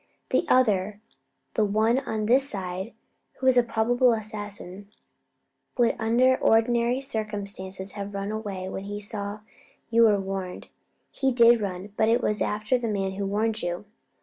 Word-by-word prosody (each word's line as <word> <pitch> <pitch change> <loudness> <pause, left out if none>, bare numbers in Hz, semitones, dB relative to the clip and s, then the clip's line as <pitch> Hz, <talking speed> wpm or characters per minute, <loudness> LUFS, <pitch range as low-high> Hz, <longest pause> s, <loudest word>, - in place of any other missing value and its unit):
The 340 - +2
other 210 -5 +2 0.5
the 220 - +2
one 220 +4 +2
on 215 -5 -3
this 265 +5 +3
side, 190 +1 -5 0.4
who 260 - -7
was 260 -1 +5
a 245 - +7
probable 240 +2 +2
assassin 205 -3 -6 0.9
would 240 -2 +3
under 245 +4 +3
ordinary 235 +2 +2
circumstances 200 -5 -5
have 200 -1 -6
run 200 +1 -3
away 200 -4 -4
when 190 +1 -5
he 205 +1 -5
saw 205 0 -4 0.5
you 230 0 +6
were 210 -2 +4
warned. 190 -1 -5 0.4
He 270 -1 0
did 235 -1 +5
run, 195 0 -5
but 220 - +3
it 235 +2 +2
was 210 0 0
after 215 +4 0
the 235 - -3
man 195 -3 -1
who 195 +1 -3
warned 215 +2 0
you." 175 +3 -3
215 Hz, 155 wpm, -26 LUFS, 200-235 Hz, 0.9 s, a